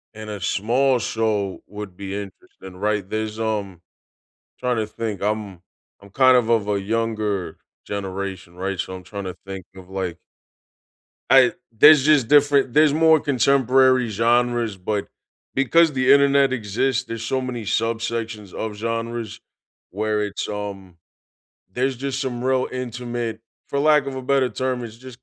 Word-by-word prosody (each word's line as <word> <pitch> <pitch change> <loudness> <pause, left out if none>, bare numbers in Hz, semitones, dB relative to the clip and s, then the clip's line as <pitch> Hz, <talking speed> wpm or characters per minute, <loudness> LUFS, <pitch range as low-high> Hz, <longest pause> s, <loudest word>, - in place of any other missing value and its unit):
And 110 0 -8
a 105 -1 -5
small 125 +7 +1
show 105 -3 -1
would 105 -2 -8
be 100 -1 -6
interesting, 95 -2 -10
right? 105 -1 -1
There's, 110 +1 -3
um 105 -5 -3 0.8
Tryna 125 -1 0
to - - -14
think, 110 -2 -5
I'm 105 -3 -3 0.4
I'm 100 - -15
kind 130 +4 +5
of 120 -2 +1
of 115 -3 +2
a 100 -1 0
younger 105 -4 -2 0.3
generation, 95 -2 -5
right? 95 0 -3
So, 95 - -3
I'm 90 - -10
tryna 95 0 -6
to - - -26
think 95 -2 -7
of 95 -1 -13
like 95 -3 -4 1.1
I 130 -2 +6 0.2
There's 150 +5 +7
just 145 -5 +4
different 145 -3 +4
There's 150 -1 +5
more 160 0 +5
contemporary 130 -2 +3
genres, 120 0 +1
but 100 +2 -3 0.5
because 160 +4 +4
the 130 0 +3
internet 140 -1 +5
exists, 120 +2 -1
there's 115 -1 -6
so 130 +3 -1
many 125 -3 -4
subsections 115 -1 -2
of 110 -1 -4
genres 115 0 -4 0.5
where 105 +2 -1
it's, 100 -1 -4
um 100 -4 -6 0.8
There's 130 +4 -1
just 135 +1 -3
some 125 -3 -3
real 130 0 +1
intimate 120 -2 -4 0.3
for 140 - -2
lack 150 -1 +4
of 135 - -4
a 130 - -5
better 130 -1 +2
term, 130 -1 -2
it's 115 -1 -9
just 125 0 -13
115 Hz, 150 wpm, -22 LUFS, 100-130 Hz, 1.1 s, There's